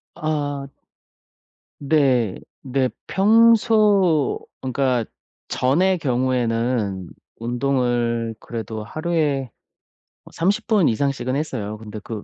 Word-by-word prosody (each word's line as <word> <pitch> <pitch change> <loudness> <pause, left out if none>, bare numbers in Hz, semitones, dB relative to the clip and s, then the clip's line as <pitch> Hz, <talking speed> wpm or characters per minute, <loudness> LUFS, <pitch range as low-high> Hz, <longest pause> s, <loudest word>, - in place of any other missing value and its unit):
아. 145 -4 -3 1.1
네 135 -8 +2 0.2
네. 130 -1 0 0.2
평소 210 - +4 0.2
그러니까 130 -3 0 0.4
전의 180 +9 +2
경우에는 120 - 0 0.3
운동을 120 -2 -1
그래도 110 -2 -6
하루에 150 -1 -1 0.8
30 200 +6 0
분 210 -7 +4
이상씩은 130 +1 -1
했어요. 115 -8 -3
근데 110 -1 -8
그 110 -3 -6
130 Hz, 170 characters per minute, -22 LUFS, 115-155 Hz, 1.1 s, 평소